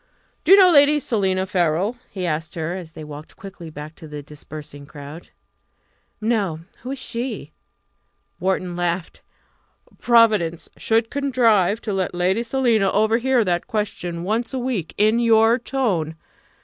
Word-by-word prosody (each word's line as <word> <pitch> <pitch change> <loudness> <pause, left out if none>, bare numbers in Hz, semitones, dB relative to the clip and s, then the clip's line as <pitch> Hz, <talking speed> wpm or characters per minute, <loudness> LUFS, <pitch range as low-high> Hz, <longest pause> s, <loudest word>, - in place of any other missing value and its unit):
"Do 330 - +2
you - - +10
know 370 -2 +7
Lady 295 -1 +6
Selina 190 -7 0
Farrell?" 180 +4 0
he 185 -3 -4
asked 160 -1 -3
her, 165 +1 -3
as 175 -4 -8
they 155 - -9
walked 150 +1 -10
quickly 190 -4 -10
back 150 0 -9
to 160 - -11
the 150 -1 -7
dispersing 145 -1 -10
crowd. 150 +3 -10 0.9
"No; 205 -8 0 0.2
who 250 - -7
is 275 - -4
she?" 235 - -4 0.9
Wharton 185 -1 -1
laughed. 175 0 -2 0.8
"Providence 215 -9 +3
should 225 0 0
contrive 230 -7 +2
to 210 - -3
let 190 -2 -2
Lady 185 +5 +1
Selina 235 -5 +2
overhear 230 +4 +2
that 175 -2 -1
question 180 -5 -3
once 225 +6 -1
a - - -1
week 245 -10 -3
in 215 +3 +3
your 225 0 +4
tone! 205 - -1
195 Hz, 145 wpm, -22 LUFS, 170-235 Hz, 0.9 s, you